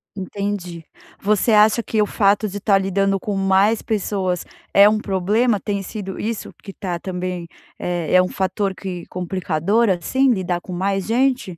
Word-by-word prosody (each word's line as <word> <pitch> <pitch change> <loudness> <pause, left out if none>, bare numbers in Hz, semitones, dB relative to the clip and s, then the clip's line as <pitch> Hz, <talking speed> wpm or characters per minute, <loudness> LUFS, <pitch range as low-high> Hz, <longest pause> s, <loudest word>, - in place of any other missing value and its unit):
Entendi, 190 -4 -4 0.3
você 215 +2 +2
acha 215 +2 +5
que 220 -1 -2
o 210 - +4
fato 205 +1 +2
de 205 +1 -6
estar 200 -1 +3
lidando 195 0 +1
com 205 0 -3
mais 195 +3 +3
pessoas 190 -4 -2 0.3
é 200 +1 +7
um 215 0 +2
problema? 205 +4 +1
Tem 200 -1 -2
sido 195 -1 -6
isso 225 0 -4
que 200 - -12
está 180 -3 -4
também 180 -2 -4 0.3
é 175 -2 -2
é 185 - +7
um 185 - 0
fator 190 +1 -2
que 180 -3 -6
complicador, 185 +4 0
assim 260 +9 +2
lidar 180 -4 -1
com 185 - -10
mais 195 +2 -1
gente? 245 -6 0
195 Hz, 165 wpm, -21 LUFS, 185-210 Hz, 0.3 s, é